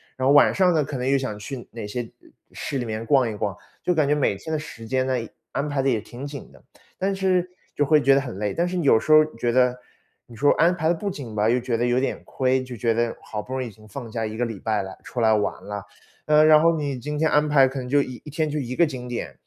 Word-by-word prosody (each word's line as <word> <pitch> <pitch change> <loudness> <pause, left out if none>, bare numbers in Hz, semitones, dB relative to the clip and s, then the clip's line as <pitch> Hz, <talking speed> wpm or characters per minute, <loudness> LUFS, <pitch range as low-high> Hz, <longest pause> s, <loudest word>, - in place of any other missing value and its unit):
然 130 0 0
后 140 - +5
晚 145 - +6
上 185 -2 +3
呢， 155 - +3
可 145 - -6
能 125 +1 -2
又 140 - +4
想 130 -6 -4
去 125 +2 -7
哪 115 -3 -6
些， 120 +4 -3 0.2
嗯， - - -21 0.2
市 140 - -4
里 125 - -2
面 110 0 -4
逛 130 +1 +3
一 110 - -4
逛， 100 -1 -3 0.3
就 180 - +1
感 150 -3 +2
觉 145 - +3
每 145 -9 +1
天 160 +11 -6
的 155 - 0
时 130 -7 -9
间 130 +1 0
呢， 130 - 0 0.4
安 140 +2 -1
排 145 -2 -1
得 135 - +1
也 115 -4 +1
挺 120 +4 -10
紧 140 -1 -9
的。 - - -19 0.4
但 195 +1 0
是 185 -2 +1 0.3
就 145 - +2
会 155 +1 +4
觉 135 0 +5
得 135 - +4
很 125 -8 -6
累， 105 -1 -2
但 170 +1 0
是 180 +1 -3
有 140 -8 +4
时 - - -9
候 155 0 +8
觉 120 0 0
得， 125 0 +4 0.5
你 120 - -14
说 145 +5 +4
安 175 +2 +3
排 160 -2 0
得 - - +4
不 200 +4 -3
紧 130 - -7
吧， 105 +1 +1
又 125 - +3
觉 120 -2 -1
得 120 - 0
有 120 +1 +1
点 135 - -1
亏， 130 0 0
就 125 -1 -8
觉 115 0 +1
得 115 0 0
好 105 - -5
不 125 - -8
容 130 0 -1
易 - - -5
已 - - -13
经 110 +1 -18
放 115 +1 -8
假 115 -1 -2
1 110 0 -5
个 120 - -1
礼 115 -5 -4
拜 110 -2 0
了， 95 0 -9
出 120 - -5
来 110 -1 +4
玩 105 -1 -1
了。 105 0 -5 0.4
呃， 150 0 +5
然 155 -1 +7
后 165 0 +4
你 145 -4 -3
今 150 +4 -4
天 160 +1 +2
安 150 +1 +3
排 135 -3 +5
可 135 - -5
能 125 - -6
就 145 +2 +3
1 130 - -7
1 - - -8
天 155 +1 -1
就 150 0 -2
1 125 -1 -4
个 170 - +4
景 130 -4 -6
点， 120 - -5
130 Hz, 305 characters per minute, -24 LUFS, 115-150 Hz, 0.5 s, 候